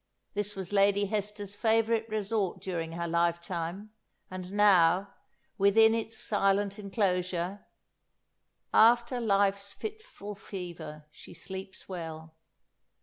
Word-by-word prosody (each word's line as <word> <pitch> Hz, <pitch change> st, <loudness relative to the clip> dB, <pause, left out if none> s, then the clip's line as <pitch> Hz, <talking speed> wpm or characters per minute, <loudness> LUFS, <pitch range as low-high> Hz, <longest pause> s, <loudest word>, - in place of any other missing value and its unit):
This 205 Hz, 0 st, -2 dB
was 190 Hz, 0 st, -6 dB
Lady 200 Hz, 0 st, +4 dB
Hester's 205 Hz, 0 st, -3 dB
favourite 225 Hz, +1 st, +1 dB
resort 210 Hz, -3 st, -1 dB
during 170 Hz, -3 st, -4 dB
her 170 Hz, 0 st, -3 dB
life 170 Hz, 0 st, +1 dB
time, 175 Hz, +4 st, -5 dB, 0.4 s
and 185 Hz, 0 st, -6 dB
now, 195 Hz, -2 st, +4 dB, 0.5 s
within 220 Hz, +3 st, +6 dB
its 225 Hz, 0 st, -3 dB
silent 200 Hz, 0 st, +1 dB
enclosure, 185 Hz, -2 st, -1 dB, 1.1 s
"'After 235 Hz, +2 st, +5 dB
life's 200 Hz, -2 st, +1 dB
fitful 425 Hz, -, -7 dB
fever 175 Hz, -6 st, -8 dB
she -, -, -14 dB
sleeps 190 Hz, 0 st, -8 dB
well.'" 160 Hz, -3 st, -7 dB
200 Hz, 105 wpm, -30 LUFS, 180-210 Hz, 1.1 s, within